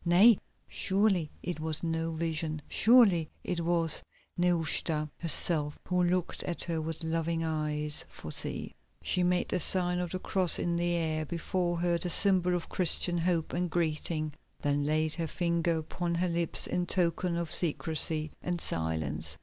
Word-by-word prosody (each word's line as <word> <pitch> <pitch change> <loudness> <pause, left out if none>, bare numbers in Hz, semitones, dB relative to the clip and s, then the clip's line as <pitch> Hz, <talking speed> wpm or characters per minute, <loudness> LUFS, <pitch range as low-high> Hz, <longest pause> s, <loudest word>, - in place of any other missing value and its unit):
Nay, 190 +6 +5 0.3
surely 190 -5 0
it 175 -3 -5
was 160 0 -3
no 165 0 -2
vision, 160 -1 -3
surely 210 -9 +3
it 175 - -3
was 165 -1 +1 0.3
Nehushta 165 -3 0
herself 155 -2 +5
who 180 0 0
looked 180 0 -1
at 175 - -5
her 165 -2 -3
with 160 +1 -5
loving 165 0 -2
eyes, 150 -1 -1
for - - -10
see! - - +1 0.3
she 180 - -1
made 180 0 0
the - - -1
sign 180 +1 +2
of 180 -1 -3
the 185 - -4
cross 185 -1 +5
in 170 0 -2
the 175 0 -1
air 160 -2 -1
before 175 0 -3
her, 175 -1 0
the 180 - -2
symbol 180 -1 +5
of 175 - -5
Christian 175 -1 +2
hope 165 -1 -2
and 175 0 -2
greeting, 155 -2 -2 0.3
then 145 0 -1
laid 155 +1 0
her 165 -2 -3
finger 170 0 -1
upon 170 +2 -4
her 180 +1 -1
lips 170 -1 +1
in 180 0 -3
token 175 -1 0
of 170 -2 -4
secrecy 155 -2 +2
and 175 -1 -3
silence. 80 - -4
170 Hz, 160 wpm, -29 LUFS, 155-175 Hz, 0.3 s, Nay